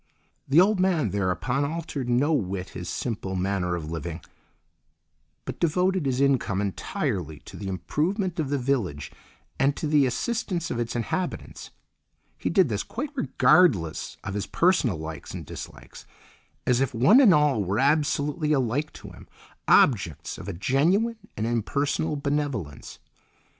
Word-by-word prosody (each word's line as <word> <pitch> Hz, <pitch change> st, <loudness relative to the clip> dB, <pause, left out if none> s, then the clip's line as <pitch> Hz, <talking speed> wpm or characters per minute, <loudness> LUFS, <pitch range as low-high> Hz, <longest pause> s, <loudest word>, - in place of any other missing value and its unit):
The 140 Hz, +4 st, +5 dB
old 195 Hz, +2 st, +4 dB
man 175 Hz, -, +2 dB
thereupon 100 Hz, -, 0 dB
altered 150 Hz, -4 st, -4 dB
no 135 Hz, +6 st, +2 dB
whit 95 Hz, -7 st, -2 dB
his -, -, -7 dB
simple 105 Hz, -5 st, -3 dB
manner 90 Hz, -1 st, -1 dB
of 80 Hz, -2 st, -6 dB
living, 85 Hz, +1 st, -5 dB, 1.2 s
but -, -, -6 dB
devoted 180 Hz, 0 st, +1 dB
his 130 Hz, -1 st, 0 dB
income 135 Hz, -8 st, +2 dB
entirely 90 Hz, -5 st, -3 dB
to -, -, -12 dB
the 100 Hz, -, -6 dB
improvement 165 Hz, -, -2 dB
of 150 Hz, -4 st, -1 dB
the 145 Hz, -, +1 dB
village 120 Hz, -, -2 dB, 0.5 s
and 140 Hz, +1 st, +3 dB
to -, -, -3 dB
the 150 Hz, -3 st, +3 dB
assistance 175 Hz, -, -2 dB
of 120 Hz, -, -2 dB
its 120 Hz, 0 st, -3 dB
inhabitants; 150 Hz, +10 st, -4 dB, 0.7 s
he -, -, -3 dB
did 190 Hz, -4 st, +4 dB
this 105 Hz, -4 st, -1 dB
quite 280 Hz, +5 st, -5 dB
regardless 170 Hz, -, +2 dB
of 100 Hz, -, -4 dB
his 100 Hz, 0 st, -3 dB
personal 170 Hz, -, +2 dB
likes 80 Hz, 0 st, -7 dB
and -, -, -7 dB
dislikes, -, -, -10 dB, 0.6 s
as 125 Hz, 0 st, +2 dB
if 130 Hz, -3 st, -1 dB
one 200 Hz, -, +6 dB
and 235 Hz, -8 st, +7 dB
all 150 Hz, -, +3 dB
were 95 Hz, +2 st, -1 dB
absolutely 150 Hz, +2 st, +1 dB
alike 135 Hz, +2 st, 0 dB
to -, -, -11 dB
him, -, -, -14 dB, 0.4 s
objects 95 Hz, -, +3 dB
of -, -, -9 dB
a 100 Hz, -, -3 dB
genuine 175 Hz, -, +1 dB, 0.2 s
and 110 Hz, -, -1 dB
impersonal 140 Hz, +7 st, -1 dB
benevolence. 140 Hz, -, -3 dB
135 Hz, 150 wpm, -26 LUFS, 100-160 Hz, 1.2 s, and